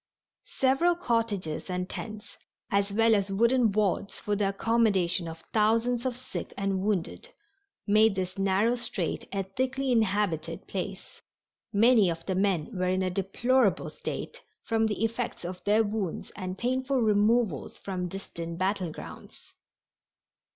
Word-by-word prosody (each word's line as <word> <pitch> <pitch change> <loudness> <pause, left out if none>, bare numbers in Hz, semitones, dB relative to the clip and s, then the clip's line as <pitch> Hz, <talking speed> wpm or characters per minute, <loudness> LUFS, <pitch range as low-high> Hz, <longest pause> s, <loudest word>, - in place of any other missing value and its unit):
Several 270 +7 +2
cottages 225 - -1
and 180 0 -2
tents, 215 +1 -7 0.4
as 200 0 +2
well 225 +2 +4
as 200 -2 +1
wooden 235 +3 +3
wards 200 -1 0
for 210 - -1
the 200 -1 +1
accommodation 195 -5 +1
of 165 0 -8
thousands 230 +3 +2
of 250 -1 -3
sick 255 - -7
and 195 -1 0
wounded, 200 - -2 0.6
made 215 0 +4
this 185 -1 -3
narrow 195 +4 +3
strait 230 -8 -3
a 195 -1 -1
thickly 260 +7 -1
inhabited 190 -7 0
place. 195 0 -6 0.5
Many 220 -2 +5
of 165 0 -4
the 190 - -1
men 185 -4 0
were 180 0 0
in 185 +1 +1
a 185 - 0
deplorable 205 +4 +1
state - - -6 0.2
from 225 -1 +1
the 215 +1 0
effects 230 -4 -3
of 180 +1 -6
their 210 +2 +4
wounds 205 -5 -3
and 185 -1 -5
painful 260 +3 0
removals 215 - +2
from 185 -2 -4
distant 170 -3 -6
battle 185 -2 0
grounds. - - -11
205 Hz, 140 wpm, -28 LUFS, 185-230 Hz, 0.6 s, Many